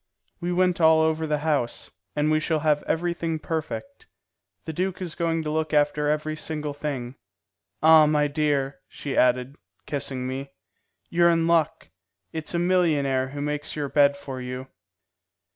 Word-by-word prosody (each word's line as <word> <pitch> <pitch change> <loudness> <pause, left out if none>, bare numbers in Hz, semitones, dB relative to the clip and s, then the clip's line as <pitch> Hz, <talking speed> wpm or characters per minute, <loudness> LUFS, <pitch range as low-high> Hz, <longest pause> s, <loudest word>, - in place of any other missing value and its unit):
"We 175 0 -2
went 180 -1 +2
all 160 0 +6
over 160 0 +1
the 150 0 +1
house, 140 -7 -1 0.2
and 150 +1 +1
we 155 - +3
shall 155 0 0
have 150 -1 +2
everything 170 -1 -1
perfect. 165 - -5 0.6
The 160 - -4
duke 185 +3 -2
is 180 -4 -4
going 165 -1 -1
to 150 - -3
look 155 0 -1
after 150 0 +2
every 155 +1 -1
single 150 -1 -4
thing. 135 -4 -5 0.7
Ah, 160 -1 +8
my 150 -1 +2
dear," 140 -2 0
she 140 -2 -6
added, 125 +3 +2 0.3
kissing 135 -3 -3
me, 135 +2 -4 0.6
"you're 170 0 +4
in 165 -1 +2
luck; 165 - +1 0.4
it's 160 +1 -4
a - - +2
millionaire 155 -7 +2
who 145 +2 -6
makes 150 +1 -3
your 145 -2 -3
bed 140 0 +4
for 135 -2 -7
you." 125 +1 -6
150 Hz, 160 wpm, -25 LUFS, 140-160 Hz, 0.7 s, Ah